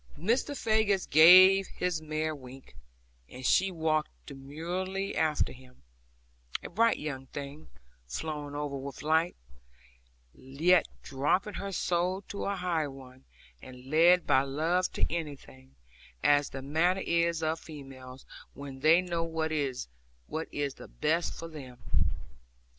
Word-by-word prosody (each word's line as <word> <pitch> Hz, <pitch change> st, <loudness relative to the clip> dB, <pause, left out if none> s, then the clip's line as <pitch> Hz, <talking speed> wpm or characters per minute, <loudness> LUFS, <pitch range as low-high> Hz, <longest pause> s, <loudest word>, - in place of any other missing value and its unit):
Mr. 240 Hz, -, 0 dB
Faggus 215 Hz, -4 st, +1 dB
gave 185 Hz, +5 st, +8 dB
his 180 Hz, -3 st, -2 dB
mare 155 Hz, 0 st, -2 dB
a -, -, -5 dB
wink, 130 Hz, -1 st, -13 dB, 0.6 s
and 130 Hz, +1 st, -9 dB
she 190 Hz, +8 st, +4 dB
walked 160 Hz, -3 st, 0 dB, 0.2 s
demurely 175 Hz, +8 st, -4 dB
after 155 Hz, -2 st, +1 dB
him, 125 Hz, -, -18 dB, 0.8 s
a -, -, -6 dB
bright 230 Hz, +5 st, +3 dB
young 135 Hz, -3 st, -6 dB
thing, 145 Hz, +3 st, -8 dB, 0.4 s
flowing 145 Hz, -, -5 dB
over 145 Hz, -1 st, -3 dB
with 135 Hz, 0 st, -7 dB
life, 160 Hz, +3 st, +2 dB, 1.0 s
yet 155 Hz, +7 st, +2 dB, 0.2 s
dropping 150 Hz, +10 st, 0 dB
her 200 Hz, 0 st, -5 dB
soul 180 Hz, +1 st, -1 dB
to 200 Hz, -, -6 dB
a 200 Hz, -, -1 dB
higher 170 Hz, -5 st, -1 dB
one, 130 Hz, -1 st, -13 dB, 0.4 s
and 130 Hz, +1 st, -12 dB
led 170 Hz, +3 st, +5 dB
by 130 Hz, -, +4 dB
love 160 Hz, +7 st, 0 dB
to -, -, 0 dB
anything; 65 Hz, -, -7 dB, 0.5 s
as 145 Hz, 0 st, +4 dB
the 135 Hz, 0 st, -7 dB
manner 170 Hz, +7 st, +1 dB
is 170 Hz, -1 st, +1 dB
of 160 Hz, +1 st, 0 dB
females, 135 Hz, -4 st, -11 dB, 0.3 s
when 140 Hz, -1 st, -8 dB
they 160 Hz, +5 st, +5 dB
know 170 Hz, -2 st, -2 dB
what 160 Hz, -1 st, -2 dB
is 140 Hz, -5 st, -2 dB, 0.4 s
the 145 Hz, -3 st, -4 dB
best 165 Hz, +3 st, +1 dB
for 165 Hz, -, -7 dB
them. 135 Hz, -6 st, -10 dB
155 Hz, 130 wpm, -29 LUFS, 140-175 Hz, 1.0 s, gave